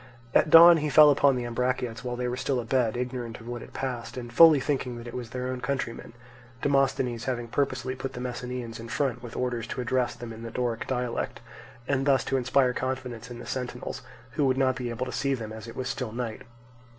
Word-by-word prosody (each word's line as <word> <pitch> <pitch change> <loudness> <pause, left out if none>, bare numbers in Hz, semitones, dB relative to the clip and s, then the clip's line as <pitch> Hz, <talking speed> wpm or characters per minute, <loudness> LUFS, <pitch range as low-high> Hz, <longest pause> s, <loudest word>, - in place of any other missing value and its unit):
At - - +4
dawn 170 +2 +10
he 150 -1 -1
fell 150 +1 +8
upon 140 -1 +4
the 125 -1 -2
Ambraciots 125 -1 -2
while 125 -1 -3
they 125 0 -2
were 125 - -2
still 130 0 -1
abed, 120 -1 0
ignorant 125 -2 -4
of 115 - -12
what 120 -1 -5
had - - -11
passed, 120 -2 -4
and 120 -1 -7
fully 160 +1 +8
thinking 130 -3 -2
that 120 - -9
it 120 - -8
was 120 -2 -5
their 125 0 -4
own 130 -1 -4
countrymen—Demosthenes 125 0 -2
having 120 -2 -2
purposely 130 0 -1
put 135 0 -5
the - - -6
Messenians 125 -2 -5
in 115 +1 -8
front 125 -1 -1
with 120 -2 -9
orders 120 -2 -2
to 125 - -5
address 125 0 0
them 120 -1 -8
in 110 - -10
the 115 - -6
Doric 120 -1 -2
dialect, 125 -2 -2 0.5
and 135 0 0
thus 135 -1 +4
to 135 - 0
inspire 125 0 +2
confidence 125 -3 -4
in 120 - -8
the 120 - -9
sentinels, 125 -1 -5 0.3
who 140 +5 +1
would 130 0 +2
not 130 -1 +2
be 125 -1 -4
able 120 +2 -3
to 125 - -5
see 140 -1 0
them 110 -3 -7
as 110 +1 -9
it 115 - -9
was 130 - -3
still 125 -4 -3
night. 115 -1 -4
125 Hz, 225 wpm, -27 LUFS, 120-130 Hz, 0.5 s, dawn